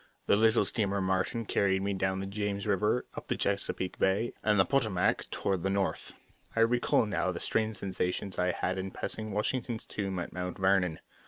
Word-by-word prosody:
The - - +4
little 110 0 +4
steamer 100 -1 0
Martin 95 +4 0
carried 95 -2 +1
me 100 0 0
down 95 0 0
the - - -3
James 100 0 -3
River, 105 +4 +1
up - - -8
the - - -1
Chesapeake 100 -2 -1
Bay, 100 +5 +2
and 105 -2 +3
the 95 - +6
Potomac, 110 -7 +1
toward 95 -3 -1
the 95 - 0
North. 100 -1 -1 0.4
I 115 - +3
recall 120 0 +3
now 100 -3 0
the 85 - -5
strange 110 -1 0
sensations 95 0 -2
I 90 0 +2
had 95 - -2
in 95 +1 -3
passing 110 +3 -4
Washington's 115 +2 -1
tomb 95 -2 -3
at 90 - -4
Mount 90 0 -4
Vernon. 95 -4 +2
100 Hz, 185 wpm, -30 LUFS, 95-110 Hz, 0.4 s, the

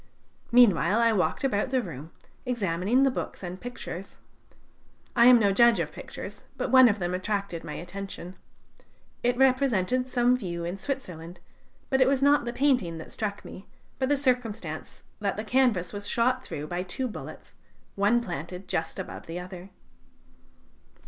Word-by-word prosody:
Meanwhile, 210 -5 +5
I 230 -1 +4
walked 195 +5 0
about 255 -3 +1
the 260 0 +2
room, 160 - -7 0.3
examining 220 0 +1
the 270 - +4
books 250 - -5
and 180 +1 -6
pictures. 200 -6 -7 1.0
I 235 -1 +7
am 250 -1 +9
no 205 -3 +3
judge 235 +3 +5
of - - -2
pictures, - - -9
but - - -2
one 260 -2 +8
of 210 - 0
them 175 -2 -2
attracted 195 -2 -2
my - - -6
attention. 185 0 -7 0.9
It 245 0 +1
represented 255 -2 +2
some 245 0 +3
view 170 -8 -4
in 180 +3 -4
Switzerland, 180 - -5 0.5
but 265 0 +3
it 260 - +6
was 275 0 +2
not 285 -2 +4
the 240 - -2
painting 245 - +1
that 160 - -9
struck 205 -2 -4
me, 190 - -10 0.3
but 260 0 0
the 290 - +3
circumstance 230 - -2 0.2
that 200 -2 -1
the 215 - -3
canvas 230 -7 +1
was 205 0 -4
shot 255 +3 +1
through 150 0 -6
by 175 +3 -3
two 190 +8 -3
bullets, 225 - -9 0.4
one 205 +4 +2
planted 180 -1 -6
just 160 - -2
above - - -7
the 165 +2 -5
other. 180 +1 -9
210 Hz, 160 wpm, -27 LUFS, 180-250 Hz, 1.0 s, am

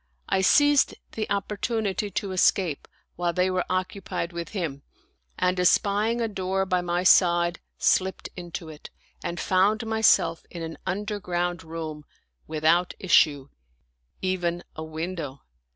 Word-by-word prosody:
I 190 - +1
seized 290 +8 +4 0.2
the 215 -1 -4
opportunity 205 0 -1
to 195 0 -3
escape 185 -4 +1 0.3
while 175 0 0
they 180 +1 +1
were 185 -1 0
occupied 185 -2 -3
with 170 0 -5
him, 165 -9 -4 0.6
and 180 0 +1
espying 205 +5 +2
a 230 - +1
door 190 -2 -1
by 185 -1 +1
my 175 0 -1
side, 175 -2 +4 0.2
slipped 190 0 +1
into 175 -2 -7
it 155 -1 -10 0.3
and 175 0 -3
found 200 +4 +2
myself 220 -7 +3
in 170 -2 -7
an 160 0 -7
underground 180 -3 -2
room, 160 -2 -6 0.4
without 160 +3 +2
issue, 145 -6 +3 0.7
even 175 -2 -1
a 155 - -5
window. 160 -3 -5
180 Hz, 130 wpm, -26 LUFS, 170-195 Hz, 0.7 s, seized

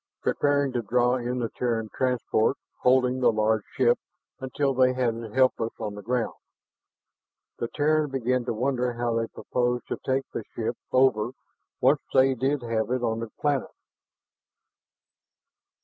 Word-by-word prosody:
Preparing 145 -1 +1
to 120 - -1
draw 125 +3 +2
in 125 0 -3
the 120 -2 -1
Terran 115 -3 -1
transport, 125 -1 +1 0.2
holding 125 0 +3
the 125 - +4
large 110 0 +1 0.2
ship 120 -2 +4 0.4
until 135 +1 -1
they 130 0 +4
had 125 -2 +1
it 115 -2 -8
helpless 130 -3 +2
on 105 -2 -4
the 105 - -8
ground. 120 +2 -1 1.3
The 120 - -1
Terran 155 +2 +1
began 125 -1 0
to 125 - -1
wonder 125 +1 0
how 120 0 -1
they 115 - -1
proposed 120 0 -2
to - - -2
take 135 0 0
the - - -3
ship - - -2 0.2
over 130 -3 +3 0.5
once 140 +3 +4
they 135 0 +5
did 135 +2 -1
have 110 -2 -1
it 125 0 -1
on 115 -1 -1
planet. 145 -2 0
125 Hz, 150 wpm, -26 LUFS, 115-130 Hz, 1.3 s, they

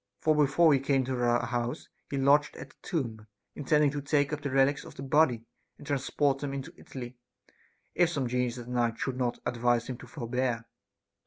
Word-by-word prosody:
For 155 -1 +2
before 150 +2 +4
he 135 - +3
came 135 0 +1
to 130 -1 -2
our 120 0 +2
house, 120 0 -3 0.2
he 140 - -3
lodged 140 +2 +3
at - - -9
the - - -27
tomb, 115 - -3 0.3
intending 150 0 +2
to 145 0 -4
take 145 0 +1
up 150 - -3
the 140 - -3
relics 135 +1 +2
of - - -12
the 135 - -7
body 135 -4 +2 0.3
and - - -13
transport 140 -1 0
them 140 -1 -4
into 135 -1 -6
Italy, 125 -2 -9 0.8
if 175 -1 +3
some 140 -6 -1
genius 125 0 -1
at 120 -1 -8
night 120 -2 0
should 135 - -2
not 125 -2 0
advise 120 0 +1
him 130 -2 -5
to - - -11
forbear. 125 -3 -2
135 Hz, 195 wpm, -29 LUFS, 120-145 Hz, 0.8 s, before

